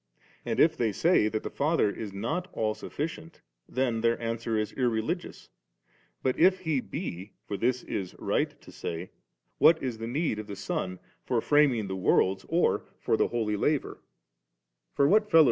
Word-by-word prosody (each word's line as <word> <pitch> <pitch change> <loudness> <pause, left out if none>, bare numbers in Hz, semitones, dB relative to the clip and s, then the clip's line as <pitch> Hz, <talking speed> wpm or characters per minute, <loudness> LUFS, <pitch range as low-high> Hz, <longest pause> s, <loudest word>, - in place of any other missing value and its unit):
For - - -5
if 160 0 +5
they 115 -6 +1
say 160 - +3
that 110 0 -2
the - - -5
Father 150 -4 +2
is 105 0 -4
not 155 - -3
all 110 -1 0
sufficient, 160 +6 -6 0.3
then 125 -3 0
their 115 0 +2
answer 115 -1 -2
is 105 -1 -2
irreligious^, 125 - -2 0.7
but 130 -1 0
if 185 +2 +5
He 160 -6 0
be, 105 - -6
for 105 - -4
this 125 +4 0
it - - -16
is 95 -3 -3
right - - -1
to - - -13
say, 85 +2 -5 0.5
what 165 -1 +6
is 120 -4 -3
the 115 - -4
ne^ 135 -3 -1
of 105 - -6
the 100 - -6
Son 90 -1 -3 0.3
for 120 - 0
framing 135 -5 +3
the 95 - -3
worlds, 95 0 +2
or 170 +2 +2
for - - +1
the - - +2
holy 110 -3 -1
4 105 - -3
Aateriut 150 -2 0 1.0
held, 210 +10 +4
t. - - +7
120 Hz, 180 wpm, -28 LUFS, 105-155 Hz, 1.0 s, t